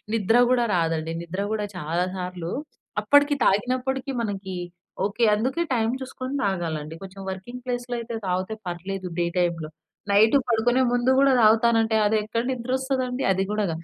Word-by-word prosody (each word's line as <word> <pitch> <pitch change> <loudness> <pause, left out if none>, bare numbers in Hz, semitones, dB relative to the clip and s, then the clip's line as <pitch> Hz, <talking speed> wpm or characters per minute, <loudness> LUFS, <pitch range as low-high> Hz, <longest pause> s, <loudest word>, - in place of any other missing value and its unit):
నిద్ర 225 +2 +3
గూడా 245 -2 +3
రాదండి. 165 -1 0
నిద్ర 185 +4 -4
గూడా 210 -1 -2
చాలా 170 +2 -1
సార్లు 180 -2 -5 0.5
అప్పడికి, 285 0 +5
తాగినప్పడికీ 255 +6 0
మనకి 195 -4 -4 0.5
ఓకే. 205 +4 -1
అందుకే 260 +10 0
టైమ్ 225 -1 +1
చూసుకొని 260 0 -6
తాగాలండి. 160 -5 -2
కొంచెం 195 0 -9
వర్కింగ్ 240 +7 -7
ప్లేస్‌లో 245 -1 -3
అయితే 235 0 -5
తాగితే 185 +3 -1
పర్లేదు 185 +2 -4
డే 170 - +2
టైమ్‌లో. 170 -3 -1 0.4
నైటు 220 +6 +6
పడుకునే 245 +3 +2
ముందు 245 +1 +2
గూడా 275 -1 +5
తాగుతానంటే 225 0 +4
అది 215 +1 +3
ఎక్కడ 230 +2 -2
నిద్రొస్తదండి? 255 +1 -1
అది 190 +1 +1
గూడా 210 0 0
గాదు. 165 +1 -6
220 Hz, 150 wpm, -24 LUFS, 185-250 Hz, 0.5 s, నైటు